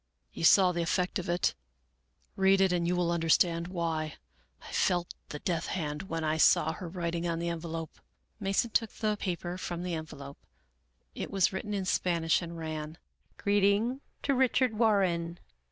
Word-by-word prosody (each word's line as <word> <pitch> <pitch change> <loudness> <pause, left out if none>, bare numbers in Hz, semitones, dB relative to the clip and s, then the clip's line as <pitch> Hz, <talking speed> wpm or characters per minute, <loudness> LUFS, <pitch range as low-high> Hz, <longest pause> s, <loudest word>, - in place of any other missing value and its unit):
" - - -44
You - - -6
saw 185 +2 +7
the 175 -1 -1
effect 180 +3 0
of 175 - -5
it; 175 +1 +1 0.8
read 195 0 +4
it 190 -1 +4
and 175 -1 +1
you 180 - +1
will 175 -1 +1
understand 170 0 +2
why. 165 -3 -2 0.5
I - - -10
felt 175 -2 +1 0.2
the 150 - -5
death 170 +1 -2
hand 155 0 -3
when 165 -1 -2
I 155 0 +1
saw - - +5
her 180 -4 -7
writing 170 -1 -2
on 165 -1 -1
the 170 +1 -2
envelope." 165 -1 -5 0.4
Mason 195 +3 0
took 225 0 +2
the 215 -1 0
paper 180 -2 -4
from 175 -1 -4
the 180 -1 -3
envelope. 145 -3 -7 0.7
It - - -5
was 195 -1 +2
written 205 +2 -3
in 195 -2 -2
Spanish, 170 -3 +1
and 170 -1 -7
ran: 155 -1 -5 0.2
" - - -40
Greeting 205 +6 +2 0.2
to 280 - +2
Richard 255 -2 +2
Warren. 190 -6 +1
175 Hz, 175 wpm, -30 LUFS, 165-195 Hz, 0.8 s, saw